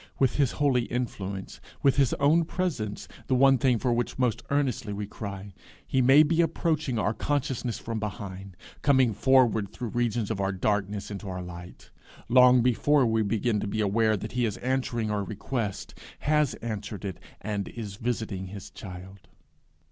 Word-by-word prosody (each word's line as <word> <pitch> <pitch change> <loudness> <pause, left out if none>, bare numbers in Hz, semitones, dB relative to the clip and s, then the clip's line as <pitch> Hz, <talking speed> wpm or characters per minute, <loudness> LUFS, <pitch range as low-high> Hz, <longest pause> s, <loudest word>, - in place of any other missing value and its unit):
With 135 -3 +2
his 140 -4 +2
holy 135 -5 +2
influence, 100 -6 -4 0.2
with 135 -1 +4
his 135 -4 +3
own 155 +4 +4
presence, 155 - -3 0.2
the 130 - +2
one 135 0 +5
thing 125 -1 +3
for 120 +2 0
which 120 0 -2
most 125 -4 +1
earnestly 130 -7 0
we 100 +1 -4
cry, 100 -1 -7 0.3
he 130 - +1
may 135 +4 +7
be 165 +2 +2
approaching 155 -6 0
our 110 0 +1
consciousness 130 -1 -2
from 115 -1 -4
behind, 95 -3 -6 0.2
coming 130 -5 +4
forward 120 -4 +3
through 120 -3 -5
regions 115 -2 -1
of 100 -3 -2
our 95 0 +1
darkness 100 +1 -1
into 100 0 -6
our 90 -1 -4
light, 90 0 -11 0.4
long 125 0 +6
before 130 +3 +3
we 110 -1 +2
begin 110 +1 0
to 100 - -3
be 110 +2 -3
aware 110 +1 +2
that 110 +3 -6
he 125 0 0
is 110 -1 -1
answering 125 -4 -1
our 105 -1 -1
request 105 +1 -4 0.3
has 150 -2 +2
answered 105 -2 -5
it, 95 -4 -5 0.2
and 105 -1 -3
is 105 -4 -7
visiting 110 -5 -3
his 100 +1 -9
child. 95 +1 -10
115 Hz, 170 wpm, -27 LUFS, 100-130 Hz, 0.4 s, may